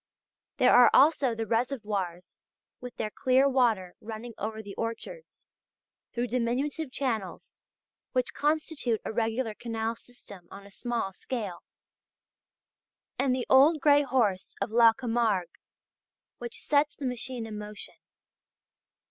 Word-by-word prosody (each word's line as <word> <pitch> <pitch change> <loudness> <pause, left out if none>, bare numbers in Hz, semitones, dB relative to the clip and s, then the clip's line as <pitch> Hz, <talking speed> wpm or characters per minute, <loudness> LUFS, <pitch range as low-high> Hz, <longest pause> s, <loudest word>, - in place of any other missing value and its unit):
There 255 - +5
are 245 0 +8
also 275 -4 +4
the 225 0 -3
reservoirs 210 -7 -2 0.4
with 250 -1 -9
their 215 - -3
clear 260 +3 +3
water 230 -9 +1
running 225 +2 -7
over 220 +1 -5
the 200 -1 -8
orchards 230 - -6 0.7
through 240 0 -1
diminutive 255 +5 -1
channels 225 -9 -3 0.6
which 255 -1 -1
constitute 295 -6 0
a - - -2
regular 225 +1 -1
canal 225 0 -3
system 200 -7 -15
on 200 0 -11
a 200 - -14
small 235 -3 -3
scale; 205 -5 -5 1.6
and 255 -2 +2
the 255 - -2
old 290 +5 +6
grey 290 0 +5
horse 240 -9 0
of - - -2
"la 230 0 +7
Camargue" 225 -7 -1 0.8
which 235 -1 -7
sets 295 0 +2
the 285 - -6
machine 250 -1 -4
in 215 -1 -6
motion. 210 0 -7
235 Hz, 125 wpm, -28 LUFS, 215-260 Hz, 1.6 s, are